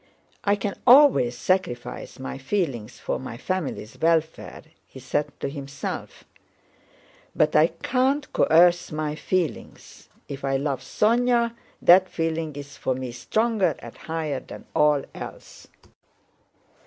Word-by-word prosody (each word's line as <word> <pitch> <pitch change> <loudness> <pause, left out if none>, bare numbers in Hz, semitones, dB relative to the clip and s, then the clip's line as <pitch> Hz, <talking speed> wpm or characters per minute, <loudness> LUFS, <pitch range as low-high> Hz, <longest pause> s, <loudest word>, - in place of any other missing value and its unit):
I 200 0 +3
can 200 0 -3
always 250 - +6
sacrifice 130 -11 -2
my 135 0 -6
feelings 135 - -2
for - - -3
my 125 -3 -7
family's 160 - -4
welfare," 160 -1 0 0.2
he 130 - -12
said 140 +3 -1
to - - -1
himself, 140 0 -6 1.1
"but 155 0 +2
I 155 +2 +6
can't 260 - -1
coerce 175 +2 +4
my 155 -1 -2
feelings. 175 +1 -4 0.2
If 140 0 -7
I 135 -1 +1
love 140 -1 -2
Sónya, 235 +1 +2 0.3
that 185 +1 +7
feeling 165 -3 -2
is 145 0 -9
for 130 - -1
me 130 -1 -5
stronger 215 - 0
and - - -11
higher 160 -4 -3
than - - -11
all 150 -2 +3
else." - - -10
160 Hz, 125 wpm, -24 LUFS, 135-190 Hz, 1.1 s, that